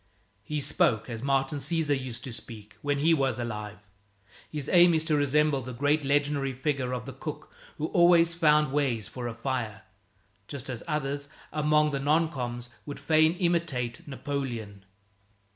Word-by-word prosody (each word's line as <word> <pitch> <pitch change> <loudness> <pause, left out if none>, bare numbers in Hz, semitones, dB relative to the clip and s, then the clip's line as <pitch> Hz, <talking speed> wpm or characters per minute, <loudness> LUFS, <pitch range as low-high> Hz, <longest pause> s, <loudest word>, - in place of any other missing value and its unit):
He 150 +8 -3
spoke 115 -3 +1
as 115 -1 -5
Martin 135 +1 0
Cesar 150 +1 0
used 130 -4 -4
to 130 - -6
speak 110 -3 -10
when 145 0 0
he 160 +4 +4
was 135 -6 +1
alive. 105 -3 -5 0.7
His 150 -2 -4
aim 175 -1 +6
is 160 - +2
to 160 -1 +1
resemble 145 0 +2
the 125 0 -7
great 145 +4 +2
legendary 140 -1 +1
figure 135 -1 -1
of 125 -2 -3
the 135 - -7
cook - - -7 0.2
who 150 - -2
always 170 -1 +5
found 150 -4 +3
ways 130 -7 0
for 125 -2 -5
a 115 - -5
fire, 115 -4 -3 0.6
just 135 -2 -6
as 120 - -5
others, 145 -1 -2 0.2
among 150 0 +3
the 140 - -1
non 155 +3 +2
coms., 120 -3 -4 0.2
would 145 - -6
fain 155 +2 +4
imitate 170 -11 -1
Napoleon. 125 -8 -5
140 Hz, 160 wpm, -28 LUFS, 125-150 Hz, 0.7 s, aim